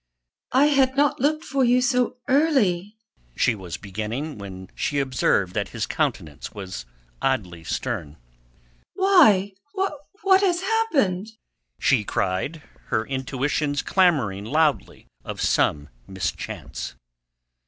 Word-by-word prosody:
"I 265 Hz, +3 st, +6 dB
had 270 Hz, -2 st, +3 dB
not 290 Hz, -1 st, +3 dB
looked 305 Hz, +4 st, +1 dB
for 270 Hz, 0 st, +1 dB
you 245 Hz, +1 st, +4 dB
so 250 Hz, -1 st, +1 dB
early...." 225 Hz, -, +2 dB, 0.4 s
she 120 Hz, -, +3 dB
was 95 Hz, -5 st, -7 dB
beginning, 110 Hz, +8 st, -5 dB
when 95 Hz, -2 st, -9 dB
she 145 Hz, -, -2 dB
observed 125 Hz, -9 st, +1 dB
that 100 Hz, -1 st, -2 dB
his 115 Hz, -2 st, -3 dB
countenance 95 Hz, -, -3 dB
was 95 Hz, -9 st, -7 dB, 0.3 s
oddly 95 Hz, -11 st, -1 dB
stern. 85 Hz, -, -3 dB, 0.8 s
"Why... 280 Hz, -, +5 dB, 0.2 s
what 385 Hz, +2 st, +1 dB
has 360 Hz, -3 st, +2 dB
happened?" 310 Hz, -, +1 dB, 0.5 s
she 130 Hz, -7 st, +3 dB
cried, 100 Hz, -, -2 dB, 0.2 s
her 110 Hz, -, -1 dB
intuitions 140 Hz, +2 st, -1 dB
clamouring 135 Hz, -, +2 dB
loudly 155 Hz, +4 st, 0 dB, 0.2 s
of -, -, -6 dB
some 75 Hz, 0 st, +1 dB, 0.2 s
mischance. 90 Hz, -8 st, -5 dB
150 Hz, 110 wpm, -24 LUFS, -, 0.8 s, I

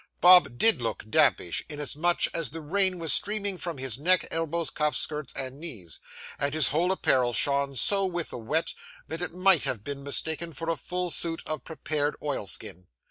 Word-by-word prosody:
Bob 180 Hz, -8 st, +7 dB
did 220 Hz, -, +6 dB
look 115 Hz, -1 st, -4 dB
dampish, 145 Hz, -, +2 dB
inasmuch 150 Hz, +3 st, 0 dB
as 165 Hz, -6 st, -2 dB
the 165 Hz, -, -8 dB
rain 185 Hz, +4 st, +1 dB
was 165 Hz, -2 st, +5 dB
streaming 205 Hz, -1 st, +2 dB
from 170 Hz, -3 st, -5 dB
his 130 Hz, -2 st, -2 dB
neck, 180 Hz, +4 st, +2 dB
elbows, 165 Hz, 0 st, -2 dB
cuffs, 150 Hz, -3 st, 0 dB
skirts, 150 Hz, -3 st, -2 dB
and 130 Hz, +1 st, -4 dB
knees; 105 Hz, -, -5 dB, 0.4 s
and 140 Hz, +1 st, -1 dB
his 155 Hz, -3 st, +3 dB
whole 170 Hz, +5 st, 0 dB
apparel 130 Hz, -9 st, +1 dB
shone 140 Hz, +6 st, +1 dB
so 195 Hz, -, +2 dB
with 175 Hz, -3 st, -4 dB
the -, -, -6 dB
wet, 155 Hz, +9 st, -1 dB, 0.4 s
that 160 Hz, +2 st, -5 dB
it 180 Hz, -, -3 dB
might 185 Hz, -2 st, +3 dB
have 110 Hz, -5 st, -3 dB
been 140 Hz, +1 st, -6 dB
mistaken 160 Hz, +4 st, -2 dB
for 165 Hz, +4 st, -3 dB
a -, -, -1 dB
full 180 Hz, +1 st, -4 dB
suit 165 Hz, +1 st, -2 dB
of 155 Hz, -, -5 dB
prepared 150 Hz, -2 st, -3 dB
oilskin. 100 Hz, -, -3 dB
155 Hz, 185 wpm, -26 LUFS, 140-175 Hz, 0.4 s, Bob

